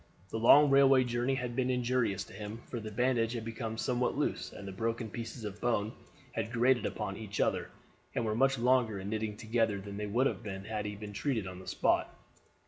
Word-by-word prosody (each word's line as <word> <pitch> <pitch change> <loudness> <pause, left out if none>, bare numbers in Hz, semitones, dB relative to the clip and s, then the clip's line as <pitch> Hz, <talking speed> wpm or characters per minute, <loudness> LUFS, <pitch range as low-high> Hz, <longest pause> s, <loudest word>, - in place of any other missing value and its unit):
The 110 - -2
long 140 +5 +7
railway 135 -1 +6
journey 120 +2 0
had 125 -2 -3
been 130 0 +1
injurious 125 -5 +1
to - - -14
him, 110 +2 -7
for 120 - -5
the 110 -1 -6
bandage 120 +1 +1
had 115 -2 -4
become 115 -1 -4
somewhat 125 +1 0
loose - - -1
and 100 - -9
the - - -5
broken 115 +2 -2
pieces 115 +1 -6
of 105 0 -6
bone 110 -3 +1 0.4
had 115 -1 -3
grated 125 +1 +3
upon 100 -3 -4
each 105 -2 -6
other, - - +1 0.5
and 115 - 0
were 110 - 0
much 135 +4 +3
longer 120 -3 +3
in 95 +1 -5
knitting 110 -1 -2
together 110 -2 0
than 100 +1 -7
they 105 0 -3
would 120 +6 +2
have 135 - 0
been 95 -3 -6
had 105 -1 -3
he 105 - -4
been 105 0 -8
treated 115 -2 -1
on 90 -1 -7
the 95 - -12
spot. - - +1
115 Hz, 220 wpm, -32 LUFS, 105-125 Hz, 0.5 s, long